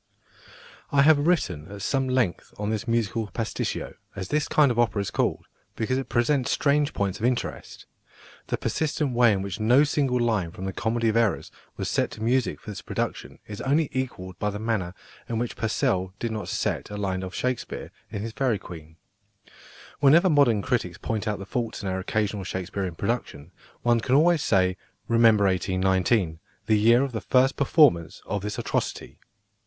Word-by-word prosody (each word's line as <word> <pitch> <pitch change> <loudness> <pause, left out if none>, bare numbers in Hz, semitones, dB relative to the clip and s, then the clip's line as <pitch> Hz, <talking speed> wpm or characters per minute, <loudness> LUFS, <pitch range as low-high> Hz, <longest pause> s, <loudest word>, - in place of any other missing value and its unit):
I 140 -1 +5
have 150 0 +5
written 90 - 0
at 100 -1 -7
some 135 +3 0
length 125 -9 -1
on 105 +1 -2
this 110 +3 -3
musical 115 -1 0
"pasticcio," 110 +2 -3 0.2
as 95 -1 -5
this 150 0 0
kind 145 -4 +4
of 120 - -1
opera 115 -3 +2
is 100 - -2
called, - - -1 0.3
because 130 +4 -1
it 135 - -6
presents 125 +2 +1
strange 145 +1 +2
points 100 -1 -2
of 110 - -1
interest. 125 -1 -4 0.6
The - - -1
persistent 150 -3 -1
way 120 -1 +5
in 95 -2 0
which 100 0 -5
no 120 +6 +5
single 140 -4 +1
line 110 -7 +1
from 90 +3 -8
The 95 - -3
Comedy 115 +2 0
of 110 - 0
Errors 115 -6 +1 0.3
was - - -3
set - - 0
to 110 - -7
music 125 +2 +1
for 105 - -8
this 100 - -7
production - - -4
is 105 -1 -7
only 145 +3 +1
equalled 95 -9 -4
by 105 - 0
the 105 - -4
manner 105 -5 -2 0.3
in 115 - -1
which 120 +1 -2
Purcell 110 - -1
did 115 +1 -3
not 110 -1 -4
set - - -2
a 105 - -6
line 95 -2 -2
of 95 0 -6
Shakespeare 125 -2 -3 0.2
in 105 -2 -5
his 115 - -4
Fairy 125 -2 0
Queen. 80 -4 -11 1.0
Whenever 160 +6 +5
modern 120 -9 +4
critics 120 -9 -1
point 110 -1 -3
out 105 -1 -1
the 100 - -8
faults 115 +1 -3
in - - -3
our 95 0 -2
occasional 105 +1 -1
Shakespearian 95 -1 -4
productions, 90 -7 -3 0.3
one 120 -1 +3
can 125 +3 +1
always 165 +2 +4
say, 95 -6 +2 0.3
"Remember 115 -3 +5
1819, 95 -1 +1 0.3
the 110 -1 +3
year 115 +4 +5
of 140 - -2
the 110 -3 -4
first 130 +3 +3
performance 135 - +3
of 105 - -2
this 105 +1 -4
atrocity." - - -3
110 Hz, 185 wpm, -25 LUFS, 95-130 Hz, 1.0 s, I